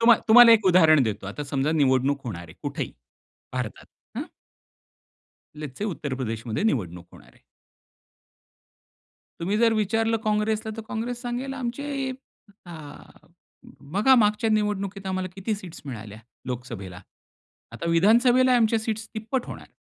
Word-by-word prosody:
तुम्हा 230 -1 +7
तुम्हाला 235 +1 +9
एक 220 -2 +4
उदाहरण 160 -5 +6
देतो. 110 -4 -3
आता 125 +9 -5
समजा 140 +2 -1
निवडणूक 140 -1 +2
होणार 90 -7 -5
आहे, 80 - -14
कुठेही - - -4 0.6
भारतात, 125 -4 -5 0.3
हं. - - -3 1.3
लेट्स 150 -4 -8
से, 205 - -2
उत्तर 150 -9 -3
प्रदेश 115 -3 -4
मध्ये 115 - -2
निवडणूक 90 - -1
होणार - - -16
आहे. - - -26 2.0
तुम्ही 195 +5 0
जर 230 0 +4
विचारलं 225 +2 +1
काँग्रेसला 215 +1 0
तर 225 - -6
काँग्रेस 240 0 -4
सांगेल 250 +3 -4
आमचे 270 +2 -3 0.6
अ, 175 - -9 1.2
बघा 215 +7 +5
मागच्या 220 -1 +2
निवडणुकीत 205 -2 -1
आम्हाला 185 0 -2
किती 200 +3 -2
सीट्स 185 -5 -10
मिळाल्या 110 -5 -8 0.3
लोकसभेला, 115 -8 -6 0.7
आता 170 - -6
विधानसभेला 240 +8 +4
आमच्या 225 -1 +3
सीट्स 220 0 -3
तिप्पट 230 +4 -3
होणार. - - -9
205 Hz, 135 wpm, -25 LUFS, -, 2.0 s, तुम्हाला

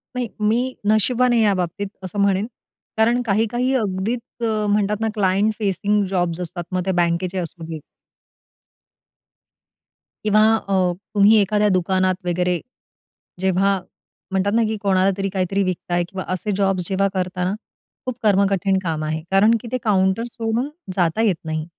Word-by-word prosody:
नाही, 250 -1 -1
मी 235 +5 +1 0.2
नशिबवान 245 +3 +3
आहे 235 - +3
या 210 -2 +4
बाबतीत 185 +3 -3 0.2
असं 190 +2 -5
म्हणेन 200 0 +2 0.5
कारण 235 +3 +3
काही 215 +1 +2
काही 250 +2 0
अगदीच 215 +1 -1 0.3
अ, 215 -1 0
म्हणतात 205 0 +1
ना, 225 - +1
क्लायंट 200 +1 +2
फेसिंग 205 0 +1
जॉब्स 175 -3 -1
असतात, 175 0 -4
मग 180 -1 -1
ते 190 - +1
बँकेचे 175 +2 -1
असू 175 -1 -5
देत. 160 -1 -6 2.5
किंवा 215 0 +4
अ, 200 -3 -3 0.4
तुम्ही 205 +1 +6
एखाद्या 210 +1 +2
दुकानात 185 0 +1
वगैरे 180 0 0 0.8
जेव्हा 190 +1 +2 0.5
म्हणतात 195 +1 +1
ना, 230 +1 +3
की 220 0 -1
कोणाला 195 -1 +3
तरी 195 0 -1
काहीतरी 195 +1 0
विकताय 175 -1 -1
किंवा 190 -1 -5
असे 195 +3 -2
जॉब्स 190 -3 +1
जेव्हा 195 0 +2
करताना 180 0 -1 0.5
खूप 255 -2 -3
कर्मकठीण 195 -2 +2
काम 160 -3 -2
आहे, 155 +1 -2
कारण 210 +4 +5
की - - -9
ते 255 - 0
काउंटर 190 0 +2
सोडून 230 +3 -1 0.3
जाता 175 +3 +2
येत 210 -5 +3
नाही. 155 -1 -3
195 Hz, 150 wpm, -21 LUFS, 185-215 Hz, 2.5 s, तुम्ही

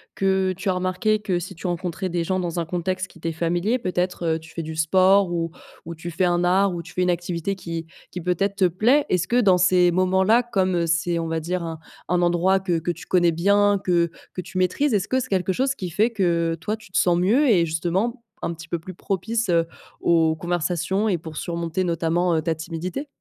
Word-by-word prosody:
que 190 -1 +1
tu 190 +2 -3
as - - +3
remarqué 185 +4 0
que 190 -4 -1
si 175 - -7
tu 170 - -5
rencontrais 175 +1 -3
des 175 -1 -1
gens 185 +2 -1
dans 175 -2 -3
un 165 - -3
contexte 185 +2 -2
qui - - -17
t'es 165 0 -3
familier, 175 +9 0
peut-être, 180 -3 -2
heu, - - -4
tu 160 0 -15
fais 165 - -4
du 160 0 -6
sport 185 +4 +4
ou 165 -1 -2 0.3
ou 170 - -6
tu 165 +2 -7
fais 175 +3 -1
un 175 0 +2
art 190 +2 +3
ou 170 - -4
tu 165 - -13
fais 185 - -1
une 180 - +2
activité 175 +2 -2
qui 165 -2 -5 0.3
qui 180 - -5
peut-être 180 +3 0
te 195 -2 +3
plaît. 235 - +3
Est-ce 180 -2 +1
que, 245 +1 +3
dans 190 -5 +5
ces 180 0 +4
moments-là, 190 +5 +3
comme 185 -7 0
c'est, 170 +1 +1
on 165 - -2
va 160 0 -2
dire, 175 +2 -2
un 165 -1 -5 0.3
un 180 0 +1
endroit 175 +2 +2
que 175 -3 0
que 165 +2 -2
tu 170 - -9
connais 175 -2 +3
bien, 200 +4 +3
que 170 -2 +2 0.2
que - - -6
tu 185 - -8
maîtrises, 200 +9 +1
est-ce 195 -2 0
que 260 - +2
c'est 255 - -4
quelque 190 -3 0
chose 265 +7 0
qui 185 -6 -5
fait 215 +8 +1
que, 170 -6 +1
heu, - - -5
toi, 210 +7 -3
tu 220 -4 -17
te - - +1
sens 175 -1 +3
mieux 240 +11 +3
et 175 -7 +4
justement, 185 +10 -1 0.2
un 170 - -1
petit 160 0 -11
peu 170 +1 -2
plus 185 +2 -10
propice, 205 +4 -2
heu, 165 -1 +2 0.3
aux 160 -2 +3
conversations 175 +4 -1
et 185 -5 +1
pour 160 -1 -9
surmonter, 170 +1 -2
notamment, 170 +1 +1
heu, 160 - +1
ta 160 +1 -1
timidité? 170 - -5
180 Hz, 235 wpm, -23 LUFS, 170-190 Hz, 0.3 s, dans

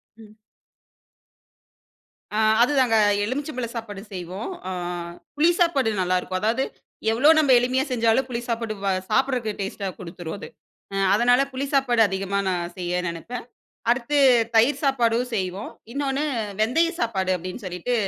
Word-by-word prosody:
ம். 215 -1 -16 2.0
ஆ, - - 0 0.2
அது 245 - +4
தாங்க 245 -4 +3 0.3
எலுமிச்சை 280 +7 -3
பழம் 235 -2 -3
சாப்பாடு 210 -4 -6
செய்வோம். 185 +3 -5 0.2
ஆ - - -3 0.6
புளி 320 +4 +4
சாப்பாடு 310 -9 +3
நல்லாருக்கும். 185 0 0
அதாவது, 230 +5 +1 0.5
எவ்வளோ 255 +7 +4
நம்ம 290 -4 +3
எளிமையா 255 +2 +1
செஞ்சாலும் 235 +1 +2
புளி 235 -1 -3
சாப்பாடு 230 -1 -2
வ - - +2 0.2
சாப்புட்றக்கு 250 -1 +1
டேஸ்ட்டா 195 0 -4
குடுத்துரும் 175 -1 -7
அது. - - -8 0.5
அ - - -3 0.2
அதனால 245 +4 +4
புளி 265 +2 -2
சாப்பாடு 255 -4 +3
அதிகமா 195 0 -2
நான் 175 -1 -2
செய்ய 180 0 -1
நெனைப்பேன். 170 +10 -6 0.5
அடுத்து 260 +4 0 0.4
தயிர் 235 +6 +4
சாப்பாடும் 245 -3 +2
செய்வோம். 190 0 -3 0.2
இன்னொனு 275 +1 -1 0.4
வெந்தயம் 330 +10 +2
சாப்பாடு 190 -5 0
அப்டின்னு 185 +6 -7
சொல்லிட்டு 180 +7 -2
230 Hz, 135 wpm, -24 LUFS, 195-260 Hz, 2.0 s, அது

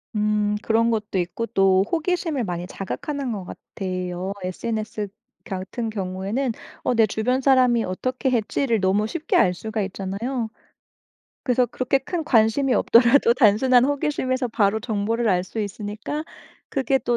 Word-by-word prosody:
음 210 0 +1
그런 230 +1 +2
것도 210 -4 -1
있고 180 +6 -2
또 195 -3 +3
호기심을 330 -5 0
많이 175 -2 -3
자극하는 260 +8 -4
것 195 -4 -5
같아요. 185 0 -5
SNS 215 +2 -3 0.4
같은 200 +4 -4
경우에는 200 +6 -2 0.3
'어 250 - +1
내 225 -1 +5
주변 245 +5 0
사람이 250 -4 +4
어떻게 255 +8 -2
했지?'를 235 +1 +1
너무 195 +3 +2
쉽게 315 +8 -2
알 180 - +4
수가 220 +4 -4
있잖아요. 205 +6 -3 1.0
그래서 250 -2 +2
그렇게 255 +3 0
큰 320 +4 -4
관심이 245 +1 +3
없더라도 235 +3 +5
단순한 245 +2 +4
호기심에서 270 -3 0
바로 220 -1 +1
정보를 225 +1 -1
알 180 -2 +2
수 220 +4 -5
있으니까 210 +8 -4 0.4
그게 270 0 +1
또 240 -2 0
225 Hz, 320 characters per minute, -23 LUFS, 200-255 Hz, 1.0 s, 내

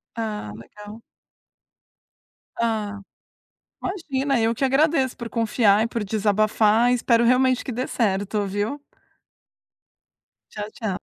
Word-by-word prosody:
Ah, 215 - -4
legal. 210 - -12 1.6
Ah, 215 -3 -1 0.8
imagina. 280 - -1
Eu 225 +1 +1
que 270 - -2
agradeço 270 0 +2
por 235 - -6
confiar 220 -2 +2
e - - +1
por 230 -2 -3
desabafar 215 +2 +2
e - - +4
espero 235 -1 +2
realmente 255 +1 +3
que 260 - -4
dê 250 +3 -2
certo, 205 -1 -1
viu. 205 +9 -3 1.7
Tchau, 210 -1 -5
tchau. 220 -8 -4
225 Hz, 115 wpm, -23 LUFS, 210-255 Hz, 1.7 s, e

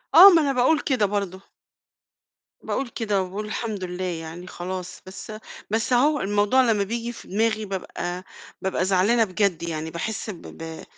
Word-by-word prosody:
آه، 395 - +12
ما 335 -4 +6
أنا 280 -2 +1
باقول 260 +5 +3
كده 255 -8 +1
برضه. 195 -2 -2 1.2
باقول 270 - -2
كده 205 -5 0
وباقول 195 +3 -4
الحمد 210 -2 -4
لله، 180 +1 -4
يعني 170 0 -5
خلاص 180 0 -6
بس، 190 +3 -9 0.4
بس 225 +3 0
هو 290 +4 +3
الموضوع 205 +6 +3
لمّا 205 -2 +2
بييجي 235 +3 -3
في - - -12
دماغي 215 +1 0
بابقى 180 -2 -4 0.4
بابقى 190 -1 0
زعلانة 200 +5 +3
بجد 190 -4 0
يعني، 160 -1 -3
باحس، 215 +6 -4
ب 180 -5 -7
ب 160 0 -8
200 Hz, 160 wpm, -24 LUFS, 180-230 Hz, 1.2 s, آه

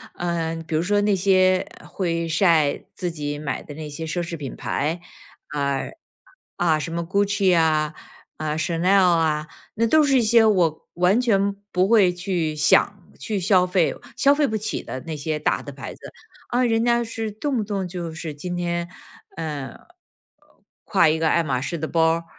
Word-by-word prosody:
呃， 170 -2 -2
比 160 - -2
如 155 - +2
说 205 +3 +1
那 205 -1 +2
些 185 -1 +3 0.2
会 170 -3 -2
晒 165 -3 +2
自 175 -2 -3
己 145 -2 -4
买 145 -3 -4
的 145 - -10
那 155 -1 -7
些 155 +3 -6
奢 165 +3 -2
侈 170 -1 -5
品 140 -3 -6
牌， 160 +4 -2 0.5
啊， 140 -2 -1 0.8
啊， 165 -3 +2
什 155 - -4
么 170 - -2
Gucci 200 0 +2
啊， 155 -1 +2 0.4
呃 155 0 -2
，Chanel 170 +3 0
啊， 160 -3 +2 0.3
那 230 +1 +1
都 310 +6 +5
是 275 -3 +3
一 - - +3
些 230 +1 +5
我 180 -7 +1
完 180 +6 +3
全 200 -5 +2 0.2
不 185 +1 +2
会 205 -5 +5
去 175 -4 -2
想 150 - +3 0.2
去 215 -3 -2
消 185 0 +3
费， 180 -2 +1 0.2
消 280 +1 +4
费 295 0 +2
不 220 -4 -2
起 215 +1 -3
的 130 - -6
那 160 -2 -4
些 155 +1 -3
大 150 - 0
的 - - -8
牌 - - -8
子。 - - -19 0.5
啊， 250 +1 +1
人 225 -1 +2
家 235 0 +2
是 225 -1 -4
动 260 +6 -3
不 220 - 0
动 195 -3 -3
就 175 -2 -5
是 160 -1 -5
今 175 +5 -5
天， 170 -1 -2 0.5
呃， 150 -4 -5 1.1
挎 180 -6 +4
一 160 - 0
个 160 - +1
爱 170 - +3
马 130 -5 -1
仕 170 +5 -3
的 160 - -3
包 160 -1 +3
儿， 165 0 -5
175 Hz, 225 characters per minute, -23 LUFS, 160-200 Hz, 1.1 s, 都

